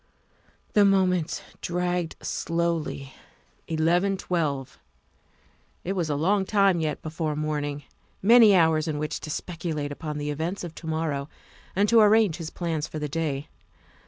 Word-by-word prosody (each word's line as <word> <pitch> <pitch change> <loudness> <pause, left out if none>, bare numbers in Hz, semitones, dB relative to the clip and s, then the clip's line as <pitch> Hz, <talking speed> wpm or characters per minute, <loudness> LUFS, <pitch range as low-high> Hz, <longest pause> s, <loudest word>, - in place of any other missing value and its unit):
The 205 - +6
moments 185 -4 +2 0.2
dragged 175 -1 -1
slowly. 165 -5 -2 0.5
Eleven 175 +5 +2
twelve. 150 -8 -2 1.0
It 190 - -2
was 175 -5 -1
a 145 - 0
long 190 +7 +2
time 195 -3 +3
yet 155 -2 -2
before 155 -1 -3
morning; 145 -1 -2 0.4
many 220 0 +7
hours 160 -3 +3
in 155 -2 -2
which 150 0 -3
to - - -8
speculate 155 -2 -4
upon 150 +1 -5
the 150 0 -2
events 165 +7 -3
of 170 -2 -6
to 165 - -10
morrow 155 -3 -2 0.5
and 200 +2 +3
to 230 +1 +5
arrange 210 -5 +4
his 165 -3 -5
plans 165 -4 -3
for - - -7
the 150 -1 -2
day. 150 -2 -2
165 Hz, 145 wpm, -26 LUFS, 150-180 Hz, 1.0 s, many